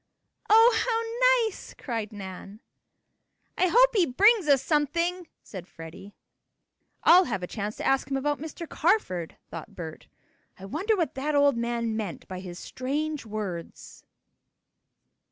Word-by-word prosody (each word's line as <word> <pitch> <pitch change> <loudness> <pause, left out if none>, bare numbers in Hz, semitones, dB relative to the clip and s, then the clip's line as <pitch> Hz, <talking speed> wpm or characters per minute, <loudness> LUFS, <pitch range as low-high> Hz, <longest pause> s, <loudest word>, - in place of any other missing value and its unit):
"Oh, 450 +2 +7 0.6
how 460 - +2
nice!" 430 - -9
cried 225 -4 -4
Nan. 195 0 -9 1.0
"I 370 - +2
hope - - +5
he 375 -7 +3
brings 405 - +4
us 275 -2 +4
something," 335 +4 0 0.2
said 185 -3 -9
Freddie. 165 +5 -11 0.9
"I'll 360 +2 +7
have 195 - -3
a - - 0
chance 210 +2 -5
to - - -6
ask 270 0 +1
him 270 - 0
about 290 +2 -1
Mr. 320 +2 -7
Carford," 300 - 0
thought 165 - -9
Bert. 160 -3 -8 0.5
"I 190 - -10
wonder 375 - 0
what 335 -8 -1
that 290 +3 -2
old 285 -2 +4
man 235 -1 -2
meant 210 -6 -5
by 185 -1 -6
his 180 -2 -8
strange 285 +4 -4
words?" 200 -6 -7
265 Hz, 140 wpm, -27 LUFS, 200-335 Hz, 1.0 s, Oh